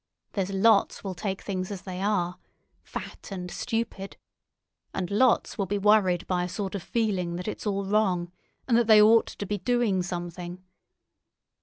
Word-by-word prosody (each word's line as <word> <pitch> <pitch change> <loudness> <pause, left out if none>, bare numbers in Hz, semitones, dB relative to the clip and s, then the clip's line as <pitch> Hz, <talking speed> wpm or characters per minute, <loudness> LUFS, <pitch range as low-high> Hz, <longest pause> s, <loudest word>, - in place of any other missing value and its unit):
There's 195 -2 -1
lots 200 +2 +3
will 195 -2 -3
take 190 +1 -4
things 185 -2 -3
as 200 -3 -6
they 185 -1 -6
are—fat 185 -3 -5
and 180 -2 -5
stupid; 225 -4 -3 0.8
and 185 -1 -2
lots 240 +1 +2
will 195 - 0
be 205 - 0
worried 195 -4 +3
by 180 -1 0
a 180 - -3
sort 195 +1 -4
of 200 - -3
feeling 195 -8 -1
that 180 +3 -5
it's 215 - -4
all 200 -1 -1
wrong, 190 -4 +1 0.4
and 240 - +3
that 235 -2 +2
they 215 -1 +8
ought 220 +2 +6
to 205 - -6
be 205 +1 -2
doing 225 -2 +1
something. 175 0 -6
195 Hz, 165 wpm, -27 LUFS, 180-210 Hz, 0.8 s, they